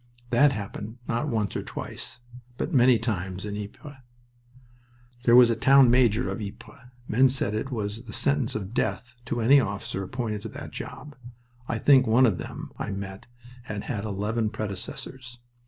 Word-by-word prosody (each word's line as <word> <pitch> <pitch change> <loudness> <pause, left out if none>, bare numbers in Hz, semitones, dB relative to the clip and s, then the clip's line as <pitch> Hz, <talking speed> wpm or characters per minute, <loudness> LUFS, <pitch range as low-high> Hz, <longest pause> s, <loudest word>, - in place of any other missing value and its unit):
That 140 +4 +5
happened, 105 0 -6
not 120 +6 -1
once 110 -4 -1
or - - -1
twice, 120 - -7 0.4
but 170 - -3
many 125 -2 +6
times 95 -4 -3
in 105 -1 -4
Ypres. 105 +8 -8 1.3
There 120 - +6
was 125 -1 +8
a - - +1
Town 135 +1 +6
Major 120 -1 +3
of 115 - -4
Ypres. 110 +4 -10 0.2
Men 130 +4 +4
said 130 -6 0
it 110 +5 -2
was 105 -4 -3
a 115 -2 -11
sentence 140 -2 0
of 105 0 -4
death 120 0 -2
to 120 0 -2
any 135 +5 +6
officer 100 -4 -3
appointed 105 +1 -3
to - - -6
that - - -8
job. 150 -1 -8 0.5
I 115 - -1
think 130 +2 +5
one 120 +4 +5
of 105 -7 +1
them - - -7
I - - -3
met 100 0 -6 0.4
had 105 -4 -5
had 105 -8 -3
eleven 110 +2 -1
predecessors. 120 +5 -6
115 Hz, 170 wpm, -26 LUFS, 105-125 Hz, 1.3 s, was